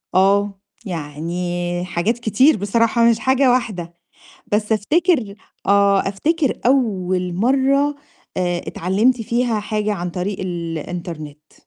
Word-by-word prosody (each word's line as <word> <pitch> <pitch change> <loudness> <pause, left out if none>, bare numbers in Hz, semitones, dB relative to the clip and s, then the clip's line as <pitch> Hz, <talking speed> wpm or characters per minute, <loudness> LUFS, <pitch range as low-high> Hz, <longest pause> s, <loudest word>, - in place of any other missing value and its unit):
آه، 195 +1 +3 0.3
يعني 175 +2 -3
حاجات 190 +6 -1
كتير 240 +6 +3
بصراحة 230 +3 +2
مش 230 -1 +2
حاجة 260 +2 +3
واحدة. 195 -9 -2 0.6
بس 210 +1 0
أفتكر 250 - +1 0.3
آه، 200 0 +4
أفتكر 295 +8 0
أول 185 -8 +1
مرّة 275 +7 +2 0.4
آآ، 175 -1 0
اتعلِّمت 215 +8 +1
فيها 235 0 0
حاجة 210 0 -1
عن 180 -2 -4
طريق 185 +3 -4
الإنترنت. 165 -3 -6
200 Hz, 110 wpm, -20 LUFS, 175-235 Hz, 0.6 s, آه